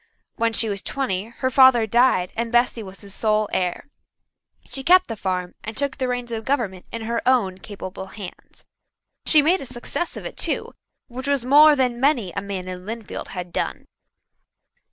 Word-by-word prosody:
When 230 0 +1
she 225 0 +2
was 200 -2 -3
twenty 210 -9 -2
her 235 +3 -3
father 260 -3 +6
died 230 -5 +3
and 230 0 -2
Bessy 240 -1 +2
was 195 -2 -10
his 200 -2 -11
sole 215 -1 +1
heir. 180 +8 -1 0.8
She 270 - -4
kept 365 +5 +6
the 225 - -5
farm 185 -3 -3
and 220 0 -6
took 280 0 -2
the 260 -2 -1
reins 245 -1 -3
of 225 -1 -3
government 220 -9 -2
in 230 -1 -5
her 230 +1 -1
own 205 -8 +2
capable 190 -2 -8
hands. 195 -2 -11 0.6
She 305 -3 +6
made 355 +5 +3
a - - -6
success 255 +8 -4
of - - -8
it - - -7
too, - - -1 0.3
which 260 +2 -7
was 280 -4 +1
more 295 +3 +7
than 250 -3 0
many 255 - +2
a - - -3
man 195 -2 -5
in 180 0 -6
Lynnfield 220 +1 -6
had 180 -2 -7
done. - - -3
230 Hz, 185 wpm, -23 LUFS, 195-260 Hz, 0.8 s, more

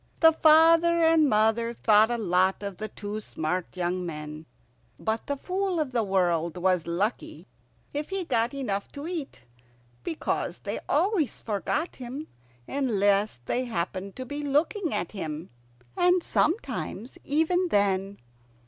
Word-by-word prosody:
The 325 -1 +8
father 330 +2 +5
and 320 -2 +5
mother 225 +2 +2
thought 220 -1 +4
a 240 - 0
lot 190 -1 +1
of 200 -3 -5
the 215 - -4
two 210 0 -6
smart 180 0 -3
young 180 +1 -1
men; 155 -1 -7 0.5
but 220 +1 -2
the 285 - -2
Fool 370 +2 -1
of 295 -4 -1
the 240 -2 +1
World 175 -4 +1
was 180 -1 +1
lucky 190 +7 -2 0.5
if 295 +1 -3
he 390 -1 -2
got 235 -6 +1
enough 240 -8 -3
to 285 +1 -7
eat, 330 - -5 0.6
because 320 - -2
they - - -4
always 370 - +1
forgot 230 - -2
him 260 +5 -7 0.4
unless 205 - +1
they 255 +1 -1
happened 190 -2 -4
to 255 - -6
be 290 +3 -5
looking 300 +5 0
at 170 - -2
him, 160 -4 -6 0.4
and 355 0 +3
sometimes 305 - -1
even 325 +5 +1
then. 200 - +1
230 Hz, 140 wpm, -27 LUFS, 190-310 Hz, 0.6 s, The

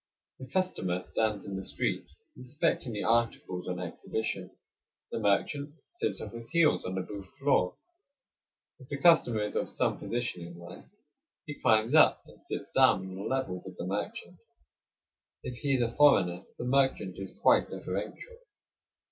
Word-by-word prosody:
The 130 - -8
customer 125 - 0
stands 105 +2 -1
in 100 -2 -5
the 95 - -3
street - - -2 0.3
inspecting 130 0 -1
the 105 - -3
articles 115 -6 0
on 90 -1 -3
exhibition; 95 +2 -4 0.6
the - - -2
merchant 140 +8 0 0.2
sits 350 - -2
on - - -6
his 115 0 -8
heels 165 -2 +3
on 95 - -3
the 95 - 0
booth 100 0 -8
floor. 135 -10 +2 1.0
If 130 - -15
the 140 - -3
customer 140 -9 +5
is 105 - -4
of - - 0
some - - 0
position 120 -6 -3
in 85 0 -9
life, 85 +1 -11 0.6
he 150 - -5
climbs 115 -2 +2
up 155 - +6
and - - -18
sits - - -6
down 95 0 +4
on - - -7
a 100 - -4
level 130 -9 -2
with 90 -1 -10
the - - -4
merchant. 100 +3 -4 1.1
If 125 - -5
he 140 0 +1
is 125 - +2
a 115 0 -3
foreigner, 95 -11 +4
the 120 - -4
merchant 125 -8 +1
is 95 -1 -8
quite - - +4
deferential. 480 -1 -5
110 Hz, 165 wpm, -30 LUFS, 95-135 Hz, 1.1 s, up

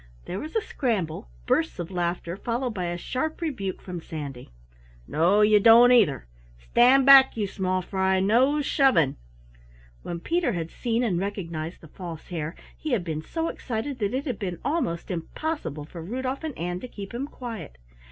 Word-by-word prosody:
There 185 - -4
was 310 +6 -7
a 445 - +3
scramble, 200 - -2 0.2
bursts 165 - +1
of 175 +1 -5
laughter, 175 -1 -2
followed 240 +4 -2
by 185 -4 -3
a 175 0 -2
sharp 285 - -3
rebuke 250 - -3
from 180 -2 -6
Sandy. 145 -6 -7 0.6
"No, 180 +7 +3
you 210 0 +6
don't 230 +3 +8
either. 200 - +4 0.3
Stand 245 - +4
back, 270 -3 +8
you 210 - 0
small 185 -1 -1
fry. 190 0 +1
No 255 +10 +3
shoving!" 260 - +3 0.9
When 170 - -5
Peter 335 - 0
had 165 -2 -4
seen 235 0 -1
and 190 -8 +1
recognized 170 -4 -4
the 160 - -12
False 165 0 -9
Hare 160 -2 -4 0.2
he 310 -4 -3
had 210 -7 +1
been 160 -3 -3
so 325 - -3
excited 250 +1 -4
that 205 +2 -1
it 270 - -2
had 250 -7 -3
been 180 -4 -3
almost 275 - -1
impossible 165 - -4
for 165 +2 -9
Rudolf 255 - -4
and 315 -4 -5
Ann 175 +1 -3
to 250 - -7
keep 200 -3 -9
him 260 +4 -3
quiet. 230 - -8
200 Hz, 175 wpm, -26 LUFS, 170-255 Hz, 0.9 s, don't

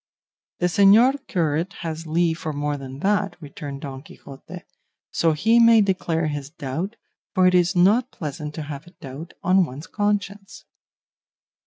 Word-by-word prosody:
"The 180 - 0
señor 215 +10 +4
curate 170 - -1
has 165 -1 -5
leave 165 +1 +1
for 155 - -4
more 145 0 -2
than 135 0 -8
that," 200 -2 0
returned 140 -2 -8
Don 135 -3 -7
Quixote, 155 +4 -12 0.5
"so 165 -1 +2
he 225 +10 +3
may 230 -1 +7
declare 180 -4 0
his 145 -2 -4
doubt, 165 - -5 0.4
for 185 - +4
it 185 - +5
is 180 +1 +3
not 210 +8 +4
pleasant 150 - -6
to 155 - -4
have 145 +2 -8
a 175 - -16
doubt 145 +3 -9
on 185 +1 +4
one's 150 0 -7
conscience." 205 -1 -3
170 Hz, 155 wpm, -23 LUFS, 150-195 Hz, 0.5 s, may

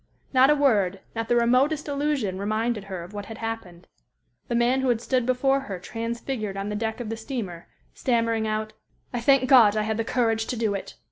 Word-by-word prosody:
Not 260 +1 +6
a 300 - +5
word, 205 -10 +2
not 225 0 -3
the 240 - +3
remotest 255 +6 +2
allusion 280 -9 -1
reminded 215 +1 -1
her 190 -3 -6
of 180 +4 -12
what 205 -1 -6
had 225 - -8
happened. 205 -6 -6 0.6
The 235 - -1
man 245 +3 +2
who 265 - +1
had 235 -2 +2
stood 250 0 0
before 270 +2 +2
her 205 -9 -6
transfigured 225 +1 -4
on 195 +1 -3
the 210 - -3
deck 220 +2 -2
of 235 -3 -5
the 225 - -2
steamer, 220 -8 -5 0.3
stammering 230 -3 0
out, 215 0 -2 0.4
"I 240 - -2
thank 265 +1 +4
God 225 -6 +6
I 215 - +1
had 220 0 -1
the 225 - 0
courage 225 -2 0
to 250 - -3
do 220 -2 0
it!" 195 - -6
225 Hz, 210 wpm, -25 LUFS, 210-255 Hz, 0.6 s, Not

